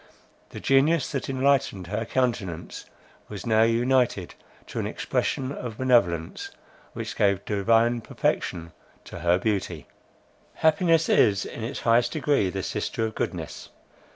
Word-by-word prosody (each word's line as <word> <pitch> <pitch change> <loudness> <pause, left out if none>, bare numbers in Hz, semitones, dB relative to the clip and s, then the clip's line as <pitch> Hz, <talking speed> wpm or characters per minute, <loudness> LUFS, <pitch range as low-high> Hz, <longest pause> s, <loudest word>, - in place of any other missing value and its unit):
The - - -8
genius 140 +3 +2
that 135 -2 -3
enlightened 135 -8 +1
her 105 +5 -3
countenance, 110 -10 -2 0.4
was 100 -3 -7
now 110 -1 +3
united 120 -4 +2 0.3
to - - -6
an - - -2
expression 130 0 -2
of 120 -5 -6
benevolence, 100 -11 +1 0.4
which - - -5
gave 100 -2 +1
divine 115 +3 +2
perfection 85 -5 -2 0.3
to - - -9
her 85 +1 +3
beauty. 95 -5 -2 0.7
Happiness 165 0 +3
is 100 -1 +3
in 115 - -7
its 125 +5 -4
highest 120 +1 +3
degree 145 -10 +1
the 95 0 -4
sister 115 - -2
of 110 - -4
goodness. - - -5
115 Hz, 130 wpm, -25 LUFS, 100-130 Hz, 0.7 s, now